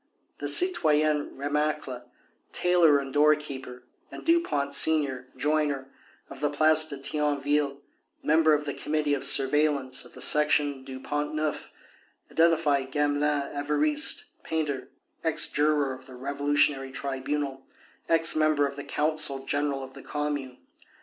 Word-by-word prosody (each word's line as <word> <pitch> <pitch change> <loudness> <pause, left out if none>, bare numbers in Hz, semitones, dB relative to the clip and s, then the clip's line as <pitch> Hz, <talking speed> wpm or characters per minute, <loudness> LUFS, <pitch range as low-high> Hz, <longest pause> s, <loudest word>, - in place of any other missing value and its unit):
The - - -4
citoyens 155 - +2
Remacle, 145 -3 -3 0.4
tailor 175 -4 +3
and 135 -1 -5
door 150 +1 +5
keeper, 130 -4 -9 0.3
and - - -11
Dupont 150 - +1
senior, 140 -4 +3
joiner, 145 -1 -1 0.4
of - - -11
the 145 +1 0
Place 155 +2 +3
de 145 -3 -7
Thionville, 145 0 -1 0.4
member 155 0 +4
of 150 0 -4
the 145 - -3
Committee 150 -1 -2
of 140 - -1
Surveillance 140 -1 +2
of - - -14
the - - -11
Section 145 -2 +3
du 130 -1 -8
Pont 145 +2 -3
Neuf, 155 -1 -3 0.6
identified 155 -5 +2
Gamelin 145 0 0
(Évariste), 290 - +1 0.2
painter, 150 -4 -3 0.3
ex 160 -1 +3
juror 145 -2 +1
of 130 +1 -13
the 130 - -12
Revolutionary 140 +1 0
Tribunal, 135 0 -4 0.4
ex 165 -1 +3
member 155 -2 +2
of 140 0 -5
the 145 - -6
Council 150 -3 +1
General 145 -1 -2
of 130 0 -11
the - - -12
Commune. 145 -4 -4
145 Hz, 135 wpm, -26 LUFS, 140-155 Hz, 0.6 s, door